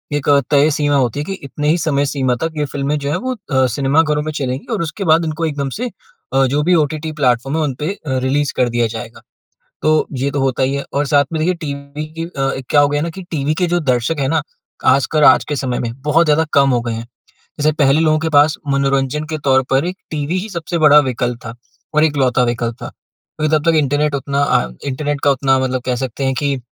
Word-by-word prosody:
एक 145 - -3
अ, 140 -1 +6
तय 145 +1 +4
सीमा 145 0 +1
होती 130 0 +1
है 145 - -1
कि 195 - -4
इतने 150 +2 -4
ही 165 - +3
समय 145 -3 0
सीमा 130 -3 0
तक 165 0 -2
ये 150 - 0
फिल्में 145 +1 -1
जो 140 0 -3
हैं - - 0
वो 255 - 0
अ, 135 - 0
सिनेमा 140 +3 +3
घरों 150 -1 0
में 155 - -3
चलेंगी 135 -3 -3
और - - -1
उसके 170 +5 -4
बाद 165 +1 +4
इनको 160 +1 -2
एकदम 140 -3 -2
से 250 0 -2 0.4
अ, 135 0 +4
जो 145 +3 +1
भी 180 +2 +3
ओटीटी 155 +2 -4
प्लेटफ़ॉर्म 130 +4 +1
है 160 - +1
उन 140 -3 -1
पे 150 +5 -1
अ, 135 -9 -4
रिलीज़ 140 +2 0
कर 125 -1 +2
दिया 120 -1 +1
जाएगा। 115 0 -9 0.6
तो 155 0 +3
ये 140 +2 0
तो 140 - -2
होता 135 -1 0
ही 135 +1 +1
है। 140 - -3
और 145 +1 0
साथ 145 0 +3
में 160 - -1
देखिए 180 +2 +1
टीवी 140 +1 -6
की 165 - -2
अ, 135 -5 -2 0.2
क्या 145 - +5
हो 145 - +4
गया 145 0 0
ना 170 - -2
कि - - -6
टीवी 150 -1 -1
के 180 +1 0
जो - - +1
दर्शक 125 +5 -1
हैं 135 - 0
ना, 155 0 +1 0.4
आजकल 140 +3 +3
आज - - +6
के 145 - -2
समय 125 -2 -2
में 115 -1 -3
बहुत 155 +3 +3
ज़्यादा 150 +2 +3
कम 140 -1 +4
हो 120 -1 +2
गए 120 -1 -3
हैं। 115 +1 -6 0.5
जैसे 155 +1 +3
पहले 140 +2 +4
लोगों 155 -1 +3
के 160 +1 -1
पास 145 +1 +4
मनोरंजन 140 +1 0
के 155 - -2
तौर 130 -1 +4
पर 135 +4 +2
एक 180 +1 -3 0.2
टीवी 155 +4 -2
ही 215 +4 -6
सबसे 170 -1 -3
बड़ा 150 -1 +7
विकल्प 125 -3 -1
था। 115 +1 -7 0.4
और 155 - +4
एकलौता 135 -5 +2
विकल्प 120 -1 -1
था। - - -5
क्योंकि 155 0 -4
तब 150 - 0
तक 165 - +4
इंटरनेट 145 0 +1
उतना 140 +1 -1
अ 65 - +1 0.2
इंटरनेट 145 +1 -2
का 145 - +5
उतना 135 0 +2
मतलब 130 -1 -1
कह 125 -1 0
सकते 130 +1 -4
हैं 135 - +1
कि 140 -2 0
145 Hz, 245 wpm, -17 LUFS, 135-155 Hz, 0.6 s, बड़ा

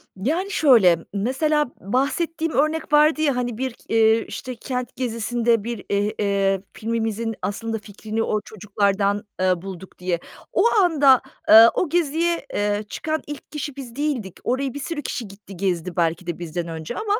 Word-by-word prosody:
Yani, 320 - -1
şöyle, 230 - +5 0.2
mesela 265 +7 +1
bahsettiğim 315 - -1
örnek 310 +2 0
vardı 305 +1 +5
ya, 285 -4 +2
hani, 245 -2 -2
bir 260 0 -2
k - - -23
eee, 225 0 +4
işte, 255 -1 -6
kent 250 +1 -4
gezisinde 235 -2 0
bir, 230 -3 -5
eee, 205 +1 +1
eee, 195 -2 +1
filmimizin 225 0 -2
aslında 225 +2 -3
fikrini 215 +2 -4
o 215 - 0
çocuklardan, 205 0 0 0.2
eee, 185 -2 +2
bulduk 190 -1 -9
diye. 180 -2 -1 0.3
O - - +3 0.2
anda, 285 -7 +5 0.3
eee, 225 +1 +10
o 360 - 0
geziye, 335 +1 0
eee, 205 +1 0
çıkan 315 0 -2
ilk 295 0 -8
kişi 295 -2 -5
biz 255 -4 -9
değildik. 270 - -2
Oraya 260 +1 -1
bir 285 - -5
sürü 295 +2 -4
kişi 240 -5 -4
gitti, 195 -1 -13
gezdi, 180 -1 -2
belki 170 0 0
de 175 -1 -4
bizden 170 0 -4
önce 160 -1 -6
ama, 425 0 0
230 Hz, 165 wpm, -23 LUFS, 200-285 Hz, 0.3 s, eee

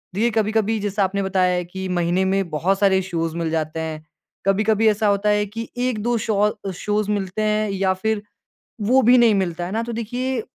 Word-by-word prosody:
दी 205 - -1
ये 235 - +4
कभी-कभी 220 0 +1
जैसा 205 0 -1
आपने 195 +1 -1
बताया 185 -1 +2
है 180 - -1
कि 190 +2 -6
महीने 175 +1 +1
में 190 -2 0
बहुत 185 +6 0
सारे 190 -2 +3
शोज़ 165 -3 -3
मिल 165 -1 -1
जाते 160 0 -2
हैं। 155 -1 -5 0.4
कभी-कभी 215 +2 +3
ऐसा 215 0 +1
होता 200 +1 +2
है 210 0 +2
कि 225 +3 -7
1-2 240 -1 0
शौ 210 -1 +1 0.2
शोज़ 210 +2 -1
मिलते 195 0 -2
हैं 215 0 +1
या 190 -1 +1
फिर 210 +3 -1 0.6
वो 250 +6 +3
भी 250 +2 +6
नहीं 230 -3 +5
मिलता, 175 -3 -1
है 185 - -6
ना। 225 +1 -1
तो 235 - -5
देखिए 245 +2 -2
205 Hz, 205 wpm, -21 LUFS, 185-220 Hz, 0.6 s, भी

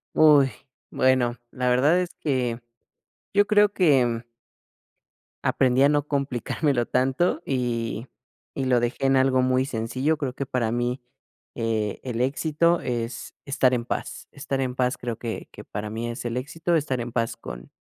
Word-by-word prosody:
Uy. 145 -4 +6 0.4
Bueno, 125 -2 +2
la 125 0 -1
verdad 140 +8 +4
es 180 - -3
que 125 -5 -1 0.7
yo 205 +1 +4
creo 210 -1 +5
que, 145 -10 +4
mm 115 -1 -2 1.2
aprendí 130 0 +2
a 140 - +6
no 145 0 +1
complicármelo 140 -1 0
tanto, 130 +9 +1
y 120 -2 -2 0.5
y 135 - -2
lo 125 -2 +3
dejé 120 +3 -1
en 135 0 +4
algo 130 -1 +3
muy 130 0 +2
sencillo, 130 +5 -1
creo 135 -4 -3
que 140 - -4
para 120 -3 -1
mí, 120 +2 -1 0.5
eh, 110 -3 -1
el 125 -3 -4
éxito 155 +6 +1
es 120 0 -4
estar 135 -2 +2
en 120 -2 -1
paz. - - -5
Estar 140 -1 -3
en 130 -2 -2
paz 125 0 0
creo 120 -2 -4
que 115 -1 -5
que - - -10
para 105 0 -5
mí 115 +2 -4
es 120 +1 -6
el 120 0 -2
éxito, 165 +6 -1
estar 140 -5 0
en 120 0 -6
paz 115 -2 -1
con - - -9
130 Hz, 165 wpm, -25 LUFS, 120-140 Hz, 1.2 s, Uy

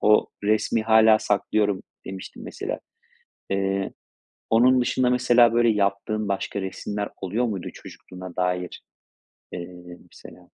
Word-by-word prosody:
o 105 0 +4 0.2
resmi 110 +2 +1
hâlâ 110 0 +6
saklıyorum 105 -1 0 0.2
demiştin 95 0 -8
mesela. - - -5 0.7
Eee, 95 0 -1 0.6
onun 125 +3 +5
dışında 125 +1 +1
mesela 120 -2 +4
böyle 120 0 +4
yaptığın 105 +1 0
başka 100 +1 -2
resimler 100 +2 -4
oluyor 105 +6 0
muydu 100 -6 -3
çocukluğuna 90 -1 -11
dair, 90 -1 -2 0.7
eee, 90 0 -9 0.2
mesela? - - -13
105 Hz, 115 wpm, -24 LUFS, 95-110 Hz, 0.7 s, hâlâ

